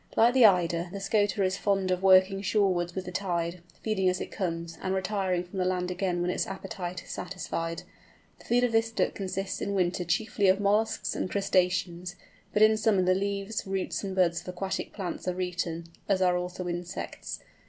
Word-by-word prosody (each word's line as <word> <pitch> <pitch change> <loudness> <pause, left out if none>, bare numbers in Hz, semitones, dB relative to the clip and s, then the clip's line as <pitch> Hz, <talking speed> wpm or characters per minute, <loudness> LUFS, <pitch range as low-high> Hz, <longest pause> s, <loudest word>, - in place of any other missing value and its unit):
Like 235 +2 +6
the 255 -4 +8
Eider 175 -2 +2
the 200 - -5
Scoter 205 0 +1
is 185 0 +1
fond 195 -2 +1
of 180 0 0
working 190 0 +5
shorewards 185 -4 +1
with 190 -1 -3
the 180 - -6
tide, 175 -2 -2 0.2
feeding 195 -4 +2
as 185 - -1
it - - -5
comes, 170 -3 -3
and 190 0 -1
retiring 190 -2 0
from 180 +2 -7
the 185 - +1
land 180 0 0
again 180 -1 -1
when 180 - 0
its - - -1
appetite 190 -2 -5
is - - -10
satisfied. 170 -2 -4 0.6
The - - -17
food 245 +1 +3
of 245 - +2
this 225 0 +2
Duck 225 - 0
consists 195 0 -3
in 200 - -1
winter 180 -1 +1
chiefly 200 +4 +1
of 190 +1 +5
molluscs 210 +2 +1
and - - -2
crustaceans; 180 -2 0 0.4
but 210 - +4
in 220 0 +6
summer 210 -4 +3
the 185 0 +4
leaves, 200 +2 -2
roots, 195 +1 -2
and 190 -1 -4
buds 170 -2 +2
of 175 - -19
aquatic 180 +1 -3
plants 185 -3 -5
are 180 0 -1
eaten, 175 -2 -2 0.2
as 195 -2 +3
are 180 -1 +3
also 180 0 -3
insects. 175 +1 -5
185 Hz, 195 wpm, -28 LUFS, 180-200 Hz, 0.6 s, the